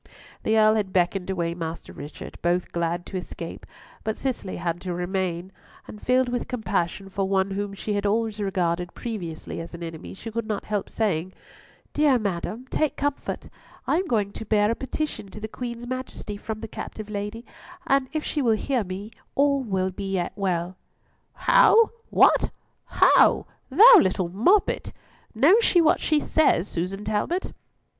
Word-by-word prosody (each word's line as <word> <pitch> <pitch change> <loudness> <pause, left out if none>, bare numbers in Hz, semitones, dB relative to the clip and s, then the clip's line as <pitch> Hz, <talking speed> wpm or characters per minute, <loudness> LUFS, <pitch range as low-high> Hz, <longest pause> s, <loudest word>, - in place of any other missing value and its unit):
The 220 0 +2
Earl 215 0 +6
had 200 -3 -1
beckoned 180 +1 +1
away 170 -3 -1
Master 165 -1 -6
Richard, 145 +2 -9
both 175 +1 0
glad 170 0 -1
to 190 - -5
escape; 170 -2 -7 0.4
but 220 0 -2
Cicely 250 -8 -3
had 170 0 -3
to 180 -2 -3
remain, 180 0 -2 0.4
and 210 - -10
filled 255 0 +3
with 245 0 -2
compassion 195 -5 -2
for 195 0 -2
one 195 0 +1
whom 200 0 -3
she 210 +2 -3
had 205 0 0
always 220 0 0
regarded 180 -3 -1
previously 175 -10 -5
as 170 +1 -8
an 170 - -8
enemy, 165 +1 -7
she 225 +3 -8
could 230 0 -3
not 210 -2 -3
help 205 -2 -2
saying, 185 -5 -1 0.6
"Dear 295 -3 +4
madam, 210 +3 -3
take 310 -2 +1
comfort; 285 0 -3 0.4
I - - +2
am 370 +1 -1
going 210 -7 +1
to 220 - -7
bear 210 0 +2
a - - 0
petition 270 -4 -4
to 210 - -9
the 215 - -4
Queen's 235 +1 -6
Majesty 255 -4 -5
from 215 +1 -6
the 225 - -5
captive 215 0 -7
lady, 210 +3 -4 0.4
and 275 -4 +2
if 310 0 -2
she 300 - -1
will 230 -4 +3
hear 255 0 0
me 195 +3 -6 0.2
all 280 0 +3
will 190 -6 -1
yet 195 -3 -2
be 205 - -10
well." 180 -1 -1 0.6
"How! 475 -3 +5 0.2
What? - - +5 0.4
How! - - +5 0.2
Thou 440 - +9
little 185 - +1
moppet! 245 - +2 0.4
Knows 345 - +5
she 355 - +4
what 325 -2 +4
she 305 -1 +2
says, 290 - +2
Susan 195 +4 -4
Talbot?" 215 - -1
205 Hz, 170 wpm, -25 LUFS, 185-245 Hz, 0.6 s, Thou